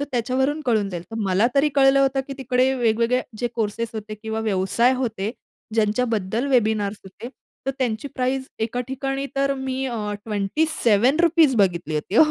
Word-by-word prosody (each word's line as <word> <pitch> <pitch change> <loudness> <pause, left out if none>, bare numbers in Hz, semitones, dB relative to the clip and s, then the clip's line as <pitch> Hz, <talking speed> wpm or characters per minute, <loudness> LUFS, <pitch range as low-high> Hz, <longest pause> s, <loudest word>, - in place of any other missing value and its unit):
तर 285 - 0
त्याच्यावरून 265 +5 0
कळून 215 -4 +2
जाईल. 175 -2 -5
तर 225 - -6
मला 195 +2 +2
तरी 280 +2 +4
कळलं 275 0 +5
होतं 270 0 +2
की 275 - -6
तिकडे 255 0 +2
वेगवेगळे 235 0 +2 0.2
जे 240 +1 -1
कोर्स 220 -1 -2
होते 215 -1 -6
किंवा 220 +1 -4
व्यवसाय 215 +4 +2
होते. 220 -5 -2 0.4
ज्यांच्याबद्दल 220 0 0
वेबिनार्स 215 -4 +1
होते 205 +5 -9 0.4
तर 270 - +2
त्यांची 240 +1 -1
प्राईस 260 +1 -1
एका 230 +2 -2
ठिकाणी 270 +1 -3
तर 275 0 +2
मी 265 0 -3
अ, 215 -4 -3
₹27 270 - +2
बघितली 175 -6 +1
होती. 150 +8 -3
235 Hz, 155 wpm, -23 LUFS, 215-265 Hz, 0.4 s, कळलं